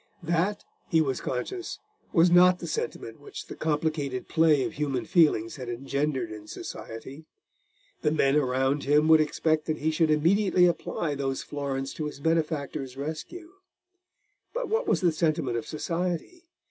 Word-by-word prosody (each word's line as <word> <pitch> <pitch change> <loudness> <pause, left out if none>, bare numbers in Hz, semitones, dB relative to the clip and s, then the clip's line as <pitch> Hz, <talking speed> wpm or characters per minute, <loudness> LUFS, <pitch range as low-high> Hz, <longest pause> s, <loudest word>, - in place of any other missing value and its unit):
That, 175 +5 0 0.3
he 165 - +4
was 135 -5 0
conscious, 355 - -4 0.3
was 170 +1 +5
not 180 +1 +7
the - - -7
sentiment 465 +1 -4
which 415 - -9
the - - -9
complicated 150 -4 -1
play 155 -4 +4
of - - -3
human 140 -3 -2
feelings 150 - +3
had 125 -3 -6
engendered 135 0 -2
in 105 -1 -9
society. 135 +11 -8 0.7
The - - +2
men 145 -2 +2
around 135 0 +1
him 150 +2 +4
would 160 -1 +7
expect 155 0 0
that 155 -1 0
he 160 +1 0
should 160 0 +2
immediately 180 +4 +4
apply 170 -2 -1
those 135 -1 -2
florins 135 -2 -3
to 155 - -4
his 150 -2 -6
benefactor's 145 -4 -1
rescue. 160 - -6 1.0
But - - -2
what 450 +3 0
was - - +2
the 175 -2 +4
sentiment 155 -6 0
of 115 - -5
society? 175 - -3
155 Hz, 155 wpm, -27 LUFS, 135-170 Hz, 1.0 s, not